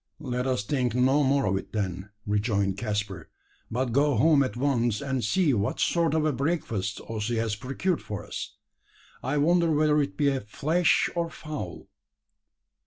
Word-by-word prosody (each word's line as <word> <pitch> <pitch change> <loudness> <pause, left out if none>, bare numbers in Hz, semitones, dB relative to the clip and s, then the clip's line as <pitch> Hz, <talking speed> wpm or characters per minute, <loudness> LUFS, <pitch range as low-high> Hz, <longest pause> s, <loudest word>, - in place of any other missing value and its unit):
"Let 125 -3 -2
us 125 -5 0
think 125 0 0
no 130 +4 +4
more 140 -1 +2
of 95 0 +1
it - - -8
then," 95 -2 -3 0.2
rejoined 100 -2 +1
Caspar; 105 -3 -3 0.4
"but 125 +1 -1
go 140 +3 +3
home 155 -2 +5
at 120 -4 -1
once 120 -5 +1
and 135 -3 -2
see 150 - +2
what 100 -2 -1
sort 165 -3 +2
of 155 -1 +2
a 155 - +2
breakfast 120 - -2
Ossy 115 +1 -3
has 115 -2 0
procured 135 - -2
for 105 0 -6
us. - - -6 0.7
I 135 +3 -1
wonder 170 +3 +3
whether 150 -1 +3
it 140 0 -3
be 140 -2 +2
flesh 155 +11 +2
or 170 -1 0
fowl." 150 - -7
130 Hz, 165 wpm, -27 LUFS, 105-150 Hz, 0.7 s, home